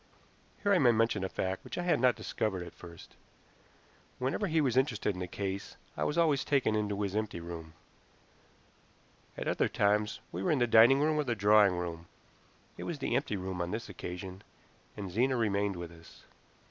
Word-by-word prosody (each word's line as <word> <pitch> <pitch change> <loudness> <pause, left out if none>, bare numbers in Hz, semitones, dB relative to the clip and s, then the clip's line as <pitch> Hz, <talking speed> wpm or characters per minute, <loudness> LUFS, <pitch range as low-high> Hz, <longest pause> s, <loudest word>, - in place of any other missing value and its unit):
Here 200 -1 +4
I 185 - +4
may 125 -5 +6
mention 115 -3 +1
a 95 - -2
fact 95 0 -3
which - - -7
I 175 - -1
had 175 -6 +2
not 125 -1 +4
discovered 95 -5 -2
at - - -11
first. 85 -1 -13 1.0
Whenever 135 +11 -1
he 160 -2 +1
was 135 -5 +1
interested 115 -6 +1
in 90 - -6
a 90 - -3
case 100 +2 -4 0.2
I - - -1
was 150 - -1
always 155 -5 +3
taken 135 -6 +2
into 105 -1 -1
his 100 0 -3
empty 110 -4 -2
room; 85 -1 -8 1.6
at - - -4
other - - +1
times 105 +1 +1
we - - -4
were - - 0
in 155 - +3
the 120 - +3
dining 120 +4 +6
room 155 +1 +2
or 150 - +2
the 120 -4 -1
drawing 105 -2 +5
room. 85 -1 -5 0.7
It - - -5
was 170 - -3
the 135 - -1
empty 135 -6 0
room 95 -1 -4
on 85 - -2
this 110 +2 -4
occasion, 90 0 -7 0.6
and 100 -3 -5
Zena 130 +7 +2
remained 100 -3 0
with 85 -1 -7
us. 85 -1 -16
105 Hz, 195 wpm, -31 LUFS, 95-130 Hz, 1.6 s, may